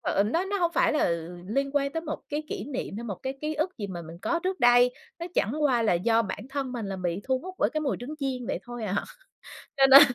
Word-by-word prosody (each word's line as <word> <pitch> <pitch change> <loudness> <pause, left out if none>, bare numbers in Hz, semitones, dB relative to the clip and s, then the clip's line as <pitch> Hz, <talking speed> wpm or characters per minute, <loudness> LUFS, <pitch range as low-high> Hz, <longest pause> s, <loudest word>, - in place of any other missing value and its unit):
ờ, 200 - +2
nó 285 - +1
nó 400 +1 -1
hông 345 -2 +1
phải - - +3
là 300 - +2 0.4
liên 275 +6 0
quan 280 -1 +1
tới 325 - -1
một 310 -2 -5
cái 300 +1 -2
kỷ 200 - -4
niệm 260 -7 -4
hay 235 - -5
một 205 -5 -3
cái 265 +1 -4
ký 305 +1 -2
ức 310 +1 -2
gì 205 - -3
mà 175 -3 -6
mình 165 +1 -10
có 340 +6 +1
trước 375 -5 -1
đây, 245 +1 +6 0.2
nó 340 - -4
chẳng 215 - +2
qua 250 -5 +3
là 220 - +3
do 225 +6 +3
bản 205 +3 -5
thân 270 -2 -2
mình 235 -4 -3
là 195 -1 -3
bị 180 +1 -2
thu 260 -1 +1
hút 370 +6 -8
bởi - - +3
cái 310 - -1
mùi 285 -3 0
trứng 265 +5 -5
chiên, 260 -4 -2
vậy - - -1
thôi 240 -3 -6
à. 195 - -1 0.8
Cho 270 - +7
nên 275 +1 +11
260 Hz, 270 wpm, -27 LUFS, 220-300 Hz, 0.8 s, nên